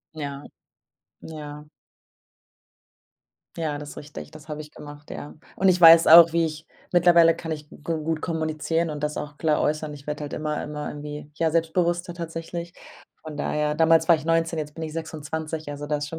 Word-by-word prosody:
Ja, 140 -2 -6 0.8
ja. 150 -2 -9 1.9
Ja, 155 -3 -2
das 145 0 -8
ist - - -13
richtig, 150 0 -9
das 155 0 -14
habe 150 0 -5
ich 150 0 -9
gemacht, 145 0 -12
ja. 145 - -7 0.2
Und, 190 0 +3
ich 180 0 +3
weiß 165 -1 +9
auch, 165 0 +9
wie 170 -1 +3
ich 155 0 -6 0.2
ich - - -34
mittlerweile 170 -1 +6
kann 165 - -6
ich 150 -1 -5
g - - -13
gut 160 -1 -2
kommunizieren 160 0 -1
und 150 -1 -5
das 150 0 -2
auch 150 0 -6
klar 155 -2 +1
äußern. 150 0 -1
Ich 145 0 -13
werde 150 0 -4
halt 145 - -6
immer 150 -1 -2
immer 150 0 -5
irgendwie 150 0 -7
ja 160 +1 +1
selbstbewusster 175 +2 0
tatsächlich. 170 0 -6 0.5
Von 155 -1 -8
daher 150 0 -1
damals 160 0 +4
war 170 - +7
ich 155 - -7
19, 165 0 +1
jetzt 150 0 -6
bin 165 - -5
ich 155 -1 -6
26, 160 -1 -5
also 145 0 -6
da 150 - 0
ist 145 0 -4
schon 165 - -7
155 Hz, 195 wpm, -24 LUFS, 150-165 Hz, 1.9 s, weiß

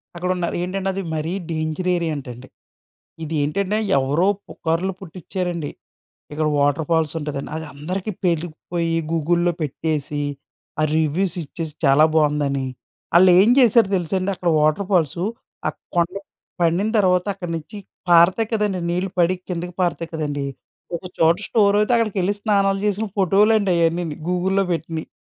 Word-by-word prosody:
అక్కడున్నారు. 180 0 -1
ఏంటంటే 190 +1 -2
అది 195 - -3
మరీ 155 +3 -2 0.2
డేంజర్ 155 +3 -2
ఏరియా 170 -2 -1
అంటండి. 125 -1 -9 0.8
ఇది 155 - -5
ఏంటంటే 200 +7 0 0.2
ఎవరో 145 +7 +1 0.2
పుకార్లు 170 +4 -1
పుట్టిచ్చారండి. 175 -2 -4 0.6
ఇక్కడ 155 +1 0
వాటర్‌ఫాల్స్ 150 +2 +1
ఉంటదని. 145 -2 -5
అది 160 - -5
అందరికీ 185 +8 -4
పేటికిపోయీ, 170 0 -1 0.2
గూగుల్‌లో 170 +2 +2
పెట్టేసి, 150 0 -2 0.6
ఆ - - +2
రివ్యూస్ 160 +5 +1
ఇచ్చేసి, 155 +1 -6
చాలా 140 +3 +6
బాగుందని. 145 -3 +1 0.5
ఆళ్ళేం 185 +4 +6
చేశారో 235 -4 +5
తెలుసండి, 185 +3 -1
అక్కడ 175 -1 -1
వాటర్‌ఫాల్సు. 170 +1 +1 0.4
ఆ - - +3 0.3
కొండ 170 -1 +3
మీద 195 - -6 0.4
పండిన 175 +5 +2
తర్వాత 180 -2 +3
అక్కడి 175 -3 -6
నుంచి 160 +6 -10 0.3
పారతాయి 175 +6 +5
కదండీ, 210 -4 0
నీళ్ళు 180 +2 -1
పడి 175 +2 +3
కిందకి 175 0 -4
పారుతాయి 170 -1 -1
కదండీ, 145 -3 -2 0.5
ఒక 170 - -7
చోట 165 +1 +5
స్టోర్ 205 -3 +3
అయితే 225 +3 +2
అక్కడికెళ్లి 205 -4 +1
స్నానాలు 195 -2 +2
చేసిన 210 +2 0
ఫోటోలండి 200 +2 +3
అయన్నీని 165 -2 -1
గూగుల్‌లో 190 +2 +1
పెట్టినయి. 165 -1 -4
175 Hz, 130 wpm, -21 LUFS, 155-190 Hz, 0.8 s, చాలా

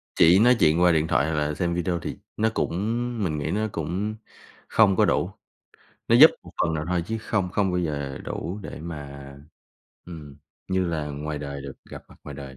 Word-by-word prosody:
chỉ 85 +3 +6
nói 125 +3 +6
chuyện 80 -1 +4
qua 90 -1 +6
điện 80 0 +2
thoại 70 - +2
hoặc - - -1
là 75 0 0
xem 85 +2 -1
video 90 0 -1
thì - - -6 0.2
nó 110 +1 +2
cũng - - 0 0.5
mình 75 -4 -1
nghĩ 70 - -2
nó 110 +2 0
cũng 95 +7 -3 0.5
không 100 -4 +4
có - - +4
đủ, - - +1 0.8
nó - - +6
giúp - - +10
một - - -13
phần 80 - +1
nào 75 -1 -2
thôi 90 -1 0
chứ 110 0 -3
không 105 -4 -1
không 100 -1 +1
bao 90 - 0
giờ 70 -4 -3
đủ 95 +5 -5
để - - -8
mà, 70 -4 -8 0.7
ừm, 75 -5 -10 0.3
như 95 0 +1
là 80 -3 -2
ngoài 75 +1 -4
đời 70 -1 -6
được 70 -1 -7 0.2
gặp - - -9
mặt - - -17
ngoài 70 - -8
đời. 70 -1 -9
80 Hz, 210 wpm, -25 LUFS, 75-95 Hz, 0.8 s, giúp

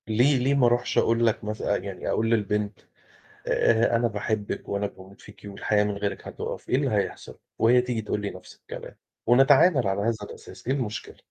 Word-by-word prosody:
ليه، 125 +6 +3
ليه 130 +3 +1
ما 140 -3 +4
أروحش 120 +1 +1
أقول 115 +1 +3
لك 115 0 +1
مثلًا 105 -1 -1
يعني 100 -2 -6
أقول 115 0 +1
للبنت 105 -2 0 0.7
آآ، 115 +1 +3
أنا 120 0 +2
باحبك 105 -1 -3
وأنا 100 0 -1
باموت 95 0 -13
فيكِ، 105 -1 -15
والحياة 105 +1 0
من 105 - -1
غيرِك 100 0 -4
هتُقف، - - -6
إيه - - +3
اللي - - 0
هيحصل؟ - - -3 0.2
وهي 120 +2 +5
تيجي 125 -2 -2
تقول 105 - -2
لي 100 -1 -3
نفْس - - -12
الكلام، - - -10 0.3
ونتعامل 135 - +5
على 95 +1 0
هذا 115 +2 +1
الأساس، 105 - -11
إيه 135 - +2
المشكلة، 110 -6 -4
110 Hz, 185 wpm, -26 LUFS, 105-120 Hz, 0.7 s, وهي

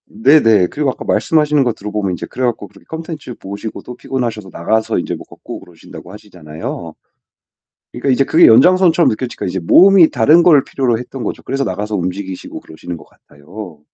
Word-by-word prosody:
네네. 110 -5 +3
그리고 145 +3 -2
아까 - - -10
말씀하시는 150 -3 +1
거 120 -2 -1
들어 105 -1 -8
보면 100 -3 -2
이제 85 - -5
그래 130 - -6
가지고 115 -4 -3
그렇게 100 +1 -21
콘텐츠 160 -5 -7
보시고 100 +3 -8
또 125 - -10
피곤하셔서 120 -6 -4
나가서 110 +7 -1
인제 - - -4
뭐 - - -11
걷고 - - -10
그러신다고 90 0 -14
하시잖아요. 85 -5 -9 1.0
그러니까 125 +3 -4
이제 130 +1 +3
그게 160 +5 +4
연장선처럼 170 +8 +5
느껴지니까 120 0 -4
이제 95 +1 -3
몸이 180 - +5
다른 150 +7 +4
걸 150 -6 +5
필요로 125 -4 -1
했던 125 +1 -8
거죠. - - -5
그래서 135 0 -2
나가서 105 0 -4
움직이시고 95 +1 -5
그러시는 85 +2 -9
것 - - -15
같아요. 80 +3 -13
110 Hz, 465 characters per minute, -16 LUFS, 95-140 Hz, 1.0 s, 연장선처럼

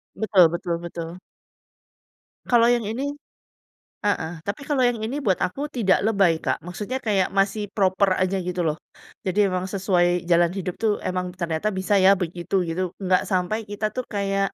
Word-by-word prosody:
Betul 200 -5 +5
betul 170 0 -2
betul. 170 0 -6 1.3
Kalau 235 -1 +4
yang 240 -2 +2
ini 225 +6 -3 1.0
heeh, 170 -6 0
tapi 200 +6 -4
kalau 280 -2 +1
yang 240 -2 0
ini 255 +6 -2
buat 190 -3 +2
aku 280 +11 -2
tidak 230 -10 +2
lebay, 195 -7 +3
Kak. - - -2
Maksudnya 205 +8 -4
kayak 200 -4 +2
masih 200 +2 +1
proper 195 0 +3
aja, 185 +1 +1
gitu 180 0 -3
loh. 155 0 -1 0.5
Jadi 190 +1 -2
emang 185 0 -1
sesuai 180 -3 +1
jalan 170 0 +4
hidup 180 -2 -3
tuh, 220 -1 +2
emang 180 -1 -2
ternyata 170 +2 -2
bisa 190 +2 +1
ya, 190 +1 +7
begitu, 175 +1 -3
gitu. 165 +3 -2 0.2
Nggak 185 -1 +3
sampai 185 +3 0
kita 210 +1 -2
tuh, 255 -1 -3
kayak 195 -1 0
190 Hz, 165 wpm, -24 LUFS, 180-215 Hz, 1.3 s, ya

